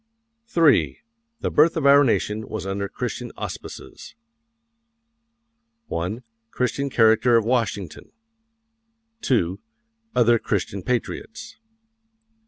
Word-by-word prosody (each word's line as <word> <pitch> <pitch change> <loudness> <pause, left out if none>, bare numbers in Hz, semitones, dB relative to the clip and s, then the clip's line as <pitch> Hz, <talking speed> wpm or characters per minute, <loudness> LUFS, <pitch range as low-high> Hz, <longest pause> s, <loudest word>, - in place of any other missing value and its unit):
III. 160 -5 +4 0.4
THE - - -1
BIRTH 160 +3 +4
OF 155 - -1
OUR 140 +1 +7
NATION 110 -4 -1
WAS - - -5
UNDER 100 +1 -3
CHRISTIAN - - -5
AUSPICES. - - -8 1.7
1. 90 +9 -3 0.3
Christian 135 +4 -2
character 115 0 +4
of 115 - +1
Washington. 115 -7 -2 1.1
2. 95 -8 0 0.6
Other 120 -1 +4
Christian 100 -1 -2
patriots. 125 - -4
115 Hz, 90 wpm, -23 LUFS, 100-130 Hz, 1.7 s, OUR